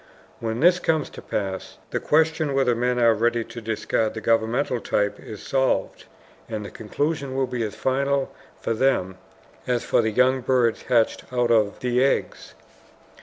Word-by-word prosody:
When 115 +1 -3
this 180 +2 +5
comes 160 -4 0
to - - -10
pass, 95 -2 -4
the - - -1
question 155 -2 +1
whether 135 -3 +3
men 125 +1 0
are 115 -2 +5
ready 115 +2 +1
to 115 - -9
discard 110 0 -1
the - - -3
governmental 115 +3 +1
type 105 -1 -1
is 105 - -9
solved. 135 -1 0 0.4
And 110 -2 -4
the - - -8
conclusion 140 +4 -3
will 135 0 +1
be 125 -1 -4
as 110 -2 -3
final 140 +1 0 0.3
for 115 - -1
them 110 -7 0 0.5
as 125 -2 0
for - - +2
the 110 - 0
young 130 +4 +3
birds 125 -3 +1
hatched 115 -3 +2
out 120 -1 +1
of 105 -3 +2
the 125 0 +2
eggs. 135 - -1
120 Hz, 170 wpm, -24 LUFS, 110-135 Hz, 0.5 s, this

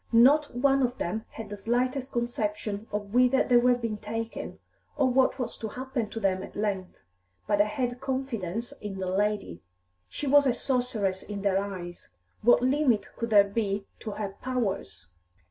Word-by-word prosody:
Not 270 +4 +5
one 270 +2 +3
of 250 -1 0
them 220 +6 -3
had 225 - -8
the 205 - -5
slightest 250 +5 -1
conception 215 -3 -2
of 205 0 -4
whither 250 +2 +5
they 245 - +4
were 245 +1 +5
being 230 -3 -3
taken, 225 +2 -5 0.4
or 275 -3 +4
what 260 +1 +3
was 250 -3 -4
to 220 - -3
happen 255 -1 -3
to 225 - -5
them 190 -3 +1
at - - -9
length. 200 -3 -2 0.5
But 205 - +2
they 205 - +5
had 245 +2 -2
confidence 240 -6 -3
in 205 -2 -5
"the 190 - -3
lady." 190 - -1 0.5
She - - -5
was 285 0 +5
a 250 - +3
sorceress 240 -7 -1
in 205 -1 -6
their 195 -1 +3
eyes; 180 -3 -7 0.3
what 240 +2 +5
limit 260 -4 +2
could 230 - -3
there 205 -2 +7
be 200 -1 -2
to - - -6
her 205 -1 -3
powers? 200 - -2
225 Hz, 175 wpm, -28 LUFS, 200-250 Hz, 0.5 s, there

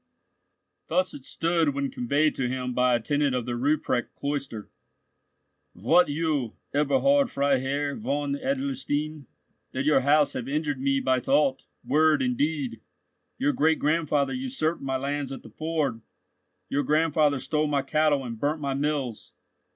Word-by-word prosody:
Thus 185 +3 +1
it 135 - -10
stood, 165 -3 0
when 140 -1 -2
conveyed 145 +5 +1
to 125 -2 -2
him 125 0 -3
by 125 0 +3
a - - +1
tenant 145 +3 0
of 125 -2 -2
the 120 - -3
Ruprecht 130 -1 0
cloister:— 140 -7 -4 1.0
"Wot 155 - +4
you, 145 -6 -1 0.2
Eberhard, 260 - +3
Freiherr 140 +1 0
von 145 -9 -2
Adlerstein, 155 - -2 0.5
that 130 +1 -2
your 150 -2 +5
house 145 +2 +3
have 125 -1 -4
injured 145 -2 -1
me 135 0 +2
by 130 -1 +2
thought, 135 +1 +1 0.2
word, 150 +2 +3
and 125 -1 0
deed. 145 -5 -2 0.6
Your 145 +2 +1
great 160 +1 +3
grandfather 150 - +1
usurped 255 -11 -2
my 135 -1 -1
lands 140 +1 -3
at 135 - -7
the - - -13
ford. 155 -7 -2 0.7
Your 145 - 0
grandfather 150 0 +2
stole 150 +3 0
my 140 -2 0
cattle 145 -1 +1
and 115 -2 -6
burnt 150 +4 0
my 140 -2 -2
mills. 140 -5 -3
145 Hz, 150 wpm, -26 LUFS, 130-155 Hz, 1.0 s, your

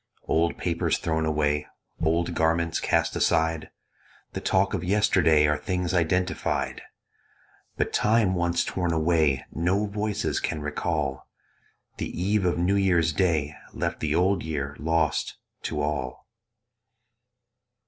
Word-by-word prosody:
Old 85 +1 +1
papers 85 -2 0
thrown 80 -1 -1
away, 75 -1 0 0.3
Old 85 +1 +1
garments 80 0 +1
cast - - +1
aside, 80 -1 +1 0.6
The - - -4
talk 95 +1 +2
of 95 -4 -2
yesterday, 90 -6 +3
Are 75 0 +1
things 90 +1 -2
identified; 90 +2 0 1.0
But - - -1
time 105 -3 +3
once 85 -1 +1
torn 90 -3 -1
away 80 -4 +2
No 95 +5 +1
voices 105 0 -2
can 80 - -2
recall: 75 -2 -2 0.7
The - - -3
eve 100 +2 +1
of 90 - +1
New 90 +4 +2
Year's 85 -5 +2
Day 75 -3 +1 0.2
Left - - -2
the 80 -1 0
Old 95 +3 +2
Year 75 -3 -4
lost 80 -2 0 0.3
to 75 - -2
all. 70 -4 -3
85 Hz, 125 wpm, -26 LUFS, 75-90 Hz, 1.0 s, yesterday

